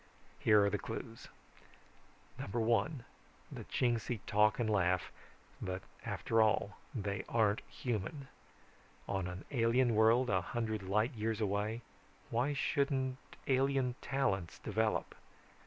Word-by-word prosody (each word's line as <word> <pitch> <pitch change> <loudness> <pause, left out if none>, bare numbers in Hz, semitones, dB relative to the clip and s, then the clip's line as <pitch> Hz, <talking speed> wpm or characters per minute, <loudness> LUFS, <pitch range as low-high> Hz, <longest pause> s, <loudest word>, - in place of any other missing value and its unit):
Here 105 -2 +5
are - - +3
the 105 - 0
clues: 115 0 -7 1.1
(1) 120 +6 0 0.5
The - - -6
Chingsi 120 -2 0
talk 105 0 +4
and 120 - 0
laugh 90 -4 +1 0.5
but 95 0 -3 0.2
after 115 0 +1
all 105 -2 +2 0.2
they 100 -3 -2
aren't 110 -2 +3
human. 125 +4 -3 0.8
On 95 -2 -1
an 90 +1 -7
alien 120 -1 +3
world 115 +4 +5
a 95 -2 +3
hundred 110 0 -2
light 105 +6 +1
years 110 0 -2
away, 105 +2 -1 0.5
why 125 +5 +1
shouldn't 135 -2 0 0.3
alien 135 -1 +2
talents 100 -11 -1
develop? 110 +1 -1
110 Hz, 115 wpm, -35 LUFS, 100-125 Hz, 1.1 s, Here